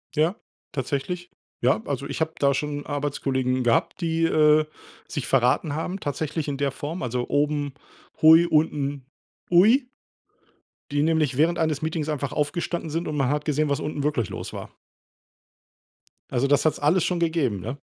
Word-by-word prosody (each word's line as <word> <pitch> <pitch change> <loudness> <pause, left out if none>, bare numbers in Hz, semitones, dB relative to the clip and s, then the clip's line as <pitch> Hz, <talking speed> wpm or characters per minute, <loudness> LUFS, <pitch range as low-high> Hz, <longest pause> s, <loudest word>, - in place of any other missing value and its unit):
Ja, 160 +6 +2 0.4
tatsächlich. 145 +7 -3 0.3
Ja, 120 -3 +3
also, 140 0 -3
ich 140 +3 -5
habe 160 0 0
da 140 -1 +3
schon 145 +1 -3
Arbeitskollegen 135 -3 -1
gehabt, 120 +8 +1
die, 165 -1 0
äh, 155 -1 +4 0.4
sich 145 - -4
verraten 135 +3 +2
haben, 180 +5 -3
tatsächlich 150 +2 -3
in 140 -1 -2
der 140 -1 0
Form. 150 +4 -5
Also, 125 0 -2
oben 145 -1 0 0.5
hui 160 +2 +8
unten 145 -4 0 0.5
ui. 225 +9 +5 1.0
Die 145 0 +1
nämlich 155 -5 +1
während 165 +3 +2
eines 155 -2 0
Meetings 160 -1 -2
einfach 140 -2 -2
aufgestanden 170 +2 -2
sind, 165 +3 -2
und 150 - -3
man 135 -3 +1
hat 150 +1 -1
gesehen, 150 0 +1
was 140 - 0
unten 150 -1 -3
wirklich 140 -8 0
los - - -6
war. - - -7 1.6
Also, 125 +3 +1
das 145 0 +3
hat's 155 - +2
alles 160 +4 +3
schon 180 -2 0
gegeben, 160 - 0
ne? 120 +9 -6
150 Hz, 160 wpm, -24 LUFS, 140-160 Hz, 1.6 s, hui